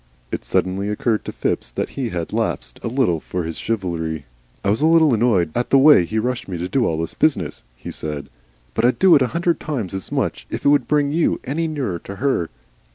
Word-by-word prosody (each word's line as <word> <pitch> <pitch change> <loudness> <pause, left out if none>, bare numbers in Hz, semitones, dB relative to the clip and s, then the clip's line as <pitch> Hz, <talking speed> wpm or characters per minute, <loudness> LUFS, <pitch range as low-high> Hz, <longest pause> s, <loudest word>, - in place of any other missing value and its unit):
It - - -3
suddenly 95 +2 0
occurred 105 +1 0
to - - -4
Phipps - - -2
that - - -3
he 130 -4 -3
had 85 -4 -4
lapsed - - -2
a - - -2
little 115 - +1
from 90 +2 -4
his 80 0 -5
chivalry. 85 -8 -2 0.4
"I 100 - +2
was 110 - 0
a 155 - +4
little 160 -4 +5
annoyed 105 -8 +2
at 120 - -1
the 135 - +5
way 140 - +7
he 110 - -3
rushed 125 +2 -1
me 90 -3 -4
to 85 +2 -3
do 120 +5 +1
all 80 -1 -1
this 80 - -3
business," 155 -3 0
he - - -8
said. 75 -2 -5 0.5
"But - - 0
I'd 125 +1 +3
do 190 -2 +6
a 130 -3 +4
hundred 170 +3 0
times 120 - -3
as 95 -1 -5
much - - -2
if - - -5
it - - +6
would 140 -4 +3
bring 145 -1 +2
you 165 +2 +1
any 160 +5 -1
nearer 130 - -3
to 100 - -9
her." 100 -7 0
115 Hz, 225 wpm, -21 LUFS, 90-140 Hz, 0.5 s, way